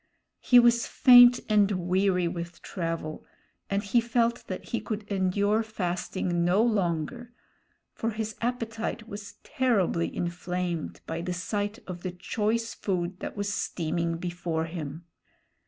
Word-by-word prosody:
He 245 - +5
was 235 -1 +5
faint 245 -1 +8
and 210 -2 +4 0.2
weary 185 -1 +2
with 170 0 -6
travel, 165 -3 -4 0.5
and 200 +1 0
he 230 +3 +3
felt 235 0 0
that 185 - -6
he 235 - -1
could 215 -1 -4
endure 200 +3 +2
fasting 180 -4 -2
no 185 +5 +3
longer; 215 +2 -1 0.6
for 230 - -2
his 220 -1 -4
appetite 230 -1 -3
was 205 -2 -8
terribly 200 -10 +1
inflamed 175 -1 -3
by 165 +1 -4
the 180 +1 -3
sight 205 +4 -2
of 180 -2 -7
the 185 - -3
choice 215 +5 -1
food 180 -2 -2
that - - -6
was 205 0 -1
steaming 170 -1 -1
before 175 -2 -2
him. 160 -1 -6
195 Hz, 135 wpm, -28 LUFS, 175-225 Hz, 0.6 s, faint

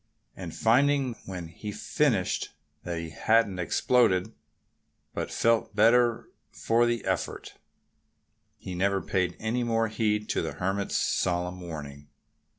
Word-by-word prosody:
And - - -7
finding, 135 +2 +3
when 90 -4 -6
he 105 +6 -8
had 105 +1 -7
finished, 115 -12 0 0.3
that 85 -2 -4
he 85 -1 -5
hadn't 110 0 +2
exploded, 110 +1 +2 0.8
but - - -3
felt 115 -2 +1
better 115 +2 +3 0.2
for 120 +1 +1
the 120 -2 -1
effort, - - -3 1.0
he 95 - -7
never 95 +2 +1
paid 90 -2 -1
any 115 +3 -1
more 115 -1 +1
heed 105 -1 0
to - - 0
the - - -4
Hermit's 95 +2 -1
solemn 90 0 -1
warning. 75 -4 -8
105 Hz, 130 wpm, -27 LUFS, 90-115 Hz, 1.0 s, finding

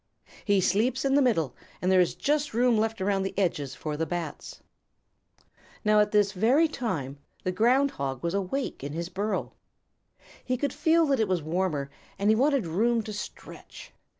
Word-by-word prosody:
"He 200 -2 +2
sleeps 235 +9 +1
in 270 - +2
the 285 - +5
middle 165 - +1 0.2
and 185 - 0
there 185 -1 +6
is 175 - 0
just 295 -4 -1
room 245 0 +3
left 220 -1 0
around 195 0 +1
the 190 0 -4
edges 150 -8 -1
for 150 -1 -4
the 160 +2 -2
Bats." 170 -3 -5 1.3
Now 210 0 +5
at 210 - +3
this 205 -2 +3
very 240 - +3
time 145 - -4 0.2
the 185 - 0
Ground 250 +8 +3
Hog 135 -2 -4
was 170 0 -1
awake 200 - -3
in 140 +1 -5
his 170 +2 -4
burrow. 200 +4 -3 0.9
He 255 0 -1
could 285 +2 -2
feel 330 0 +3
that 275 -4 +1
it 220 - +2
was 180 -4 0
warmer 155 -4 -1 0.3
and 205 +2 +3
he - - +4
wanted 270 -2 +2
room 225 +8 +1
to 215 - -6
stretch. 205 - -9
205 Hz, 180 wpm, -27 LUFS, 175-250 Hz, 1.3 s, there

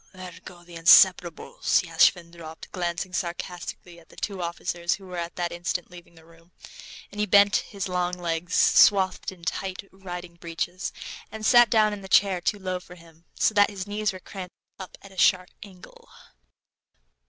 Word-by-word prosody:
"There 185 -1 -10
go 175 -1 -13
the 175 -1 -11
inseparables," 170 +1 +4
Yashvin 170 0 +2
dropped, 165 -2 -11
glancing 175 0 -4
sarcastically 175 -1 -6
at 165 - -22
the - - -18
two 195 -3 -5
officers 170 0 -2
who 195 - -15
were 180 -1 -8
at 170 0 -6
that 175 -1 -3
instant 175 0 -4
leaving 175 -1 -14
the 160 -1 -18
room. 165 +1 -22 0.6
And 205 - -9
he 210 - 0
bent 200 +1 +5
his 200 -2 -5
long 180 -1 -1
legs, 170 0 -3
swathed 190 -3 +4
in 180 -3 -16
tight 190 +3 -4
riding 180 -2 -9
breeches, 170 +2 -5 0.4
and 220 0 -7
sat 240 0 +6
down 215 -1 +3
in 205 - -7
the 190 - -10
chair, 190 -3 +3
too 205 - -1
low 185 -2 -4
for 180 0 -14
him, 165 -1 -19
so - - +1
that 205 -1 +4
his 195 -2 -6
knees 210 0 -2
were 185 - -10
cramped 185 -1 -10 0.2
up 190 - -10
in 195 - -13
a 190 - -17
sharp 185 -1 +3
angle. 190 -3 -15
180 Hz, 180 wpm, -25 LUFS, 170-195 Hz, 0.6 s, sat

